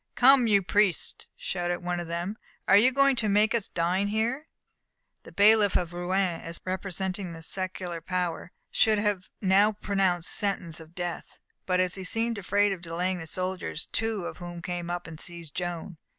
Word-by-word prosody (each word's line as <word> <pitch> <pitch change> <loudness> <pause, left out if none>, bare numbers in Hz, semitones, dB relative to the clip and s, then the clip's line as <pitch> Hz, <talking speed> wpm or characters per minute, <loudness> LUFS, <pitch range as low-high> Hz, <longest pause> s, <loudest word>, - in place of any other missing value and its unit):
"Come, 260 -1 +6
you 200 -3 +4
priests!" 200 -1 +1
shouted 175 -1 -3
one 175 0 -1
of 175 - -5
them, 170 +5 -3 0.3
"are 195 - +6
you 235 +6 +6
going 275 0 +4
to 220 -3 +1
make 210 +2 +4
us 230 -4 0
dine 180 +4 0
here?" 235 +8 -1 0.7
The - - -14
bailiff 210 0 +5
of 175 -1 0
Rouen, 175 0 0
as 165 0 -6
representing 185 0 -3
the 165 0 -9
secular 185 -1 -4
power, 180 0 -3 0.2
should 220 -1 +3
have 205 -3 -1
now 200 +2 +4
pronounced 195 -4 0
sentence 185 -5 -1
of 160 +1 -14
death, 175 -1 -5 0.3
but 185 -1 +2
he 185 +1 0
seemed 225 +3 -1
afraid 205 +1 +2
of 190 -3 -4
delaying 180 +2 -2
the 165 - -7
soldiers, 185 -2 -1
two 225 -5 -2
of - - -6
whom 175 -1 -7
came 175 -1 -4
up 175 0 -3
and 160 -1 -9
seized 170 -4 -9
Joan. 175 -1 -4
185 Hz, 175 wpm, -27 LUFS, 175-205 Hz, 0.7 s, Come